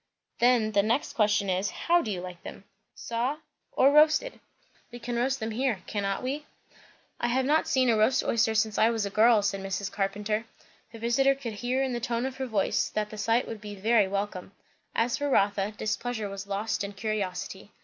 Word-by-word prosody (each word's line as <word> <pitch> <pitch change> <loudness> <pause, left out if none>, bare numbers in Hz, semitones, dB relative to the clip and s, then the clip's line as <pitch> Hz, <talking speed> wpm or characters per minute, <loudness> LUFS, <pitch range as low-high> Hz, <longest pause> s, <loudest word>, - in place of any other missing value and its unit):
"Then 240 -3 +3
the 200 -1 +4
next 230 +7 0
question 210 -2 +2
is, 190 +2 0
how 345 0 +2
do 225 - -5
you 185 -4 -3
like 180 -1 -9
them? - - -10 0.3
Saw? 240 +5 -2 0.3
or 270 +2 +4
roasted? 310 +11 +4 0.5
We 240 - -8
can 240 0 -5
roast 265 +3 0
them 220 0 -3
here, 230 -5 -1
cannot 200 0 -2
we?" 285 +4 -3 0.7
"I 240 - 0
have 255 +2 +1
not 305 +3 +2
seen 260 -1 +2
a 230 - +4
roast 220 +4 +3
oyster 225 -1 +1
since 220 -1 +1
I 225 - +5
was 225 -3 -1
a 200 - -4
girl," 220 0 +5
said 200 -1 -1
Mrs. 195 +1 -3
Carpenter. 210 +3 -2 0.5
Her 230 - -10
visiter 240 +4 +2
could 250 -5 -6
hear 245 +5 -1
in 260 -2 -1
the 240 - -2
tone 235 0 -2
of 265 0 -5
her 265 -1 -3
voice 210 -5 0
that 210 0 -3
the 215 - -8
sight 230 +3 +1
would 225 -2 -7
be 205 -1 -7
very 210 +1 +3
welcome. 200 -1 -4 0.4
As 235 +1 +1
for 290 0 -1
Rotha, 200 -3 +2
displeasure 220 0 -2
was 195 0 -7
lost 205 +1 -2
in 200 0 -5
curiosity. 195 -2 -4
220 Hz, 200 wpm, -28 LUFS, 200-245 Hz, 0.7 s, I